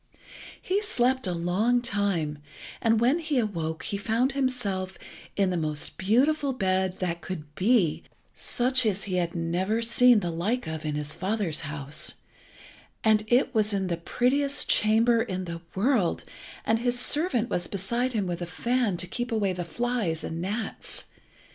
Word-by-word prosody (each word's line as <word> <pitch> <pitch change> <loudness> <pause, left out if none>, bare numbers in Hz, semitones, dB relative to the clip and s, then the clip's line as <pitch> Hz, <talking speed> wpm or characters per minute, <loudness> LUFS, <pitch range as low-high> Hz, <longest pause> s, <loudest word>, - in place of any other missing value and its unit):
He 390 +3 0
slept 260 - +1
a - - 0
long 185 +9 +1
time, 200 -10 -1 0.4
and 225 -1 +3
when 255 +8 +3
he 310 -4 -1
awoke 165 -8 -2
he 200 - -2
found 230 +6 +1
himself 230 -9 -2 0.4
in 195 -2 +2
the 180 - 0
most 155 -2 -3
beautiful 270 +8 +2
bed 190 -4 0
that 170 -2 -2
could 155 -5 -7
be, 195 -4 +2 0.3
such 255 +1 +1
as 200 -3 0
he 185 -3 -2
had 170 -1 -1
never 180 +7 0
seen 235 -1 +5
the 175 - -2
like 205 +10 -1
of 160 -1 -4
in 150 - -1
his 150 0 -2
father's 195 -5 -1
house, 145 -1 -3 0.9
and 215 -1 +4
it 250 +3 +3
was 215 -2 +2
in 190 -2 -1
the 170 - +1
prettiest 275 +10 +1
chamber 225 +2 +4
in 185 -5 -3
the 170 -1 -6
world, 205 -3 +1 0.4
and 225 0 +2
his 245 +1 0
servant 270 -3 +2
was 175 -1 -1
beside 235 +6 -1
him 210 -4 0
with 175 -1 -3
a 175 - -3
fan 235 +1 0
to 180 - +1
keep 240 +5 -4
away 205 -4 +1
the 180 0 -3
flies 210 -3 -2
and 165 +1 -4
gnats. 210 +5 -4
205 Hz, 165 wpm, -27 LUFS, 175-245 Hz, 0.9 s, seen